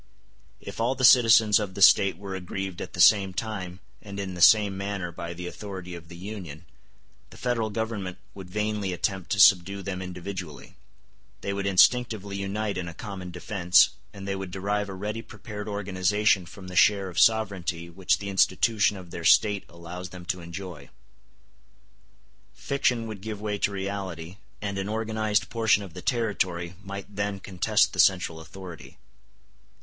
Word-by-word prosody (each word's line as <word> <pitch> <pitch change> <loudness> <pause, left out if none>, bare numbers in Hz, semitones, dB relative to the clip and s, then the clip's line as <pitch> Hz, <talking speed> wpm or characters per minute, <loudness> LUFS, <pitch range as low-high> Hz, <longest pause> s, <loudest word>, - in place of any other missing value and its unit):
If 100 +2 -7
all 125 +3 +1
the 130 - -4
citizens 115 -4 +7
of 100 -3 -5
the 100 - -5
State 95 -3 +6
were 100 0 -7
aggrieved 95 0 -5
at - - -7
the - - -8
same 100 -3 +5
time 95 -5 -5 0.2
and 100 -1 -8
in 95 -2 -4
the 90 - -6
same 105 -1 +6
manner 100 -2 -4
by 85 +1 -7
the 90 +1 -7
authority 95 -1 -7
of 85 -2 -10
the 85 0 -11
Union, 90 -5 -8 0.6
the - - -15
Federal 120 -3 -1
Government 105 -4 -4 0.2
would 95 -2 -10
vainly 105 -1 -2
attempt 90 +1 -2
to 100 - -1
subdue 95 +2 +5
them 95 -1 -4
individually; 90 -3 -7 0.7
they 100 - -3
would 100 0 -2
instinctively 100 0 +3
unite 100 0 -2
in 85 - -4
a 85 - -8
common 95 -3 -7
defence, 90 0 +3 0.2
and 100 -1 -9
they 100 - -1
would 95 -1 -5
derive 100 +2 -2
a 95 - -6
ready 105 +4 -4
prepared 105 -1 -9
organization 100 -1 +1
from 95 +1 -11
the 90 - -8
share 100 +1 +4
of 90 -1 -3
sovereignty 95 -7 +2
which 90 +2 0
the 100 - -6
institution 100 +2 +2
of 90 -2 -11
their 85 - -6
State 100 +3 +4
allows 85 +2 -8
them 90 0 -11
to 90 0 -3
enjoy. 85 -4 -8 1.7
Fiction 125 -4 0
would 110 -3 -7
give 105 0 -6
way 105 -1 -3
to 100 - +1
reality, 95 -3 -5 0.3
and 100 -1 -3
an 95 +1 -3
organized 110 -1 -1
portion 110 -3 +2
of 95 -4 -11
the 90 - -8
territory 95 -8 -1
might 100 0 -8
then 100 0 -2
contest 95 -2 +1
the - - -6
central 90 -4 +3
authority. 85 +1 -11
100 Hz, 170 wpm, -26 LUFS, 90-105 Hz, 1.7 s, citizens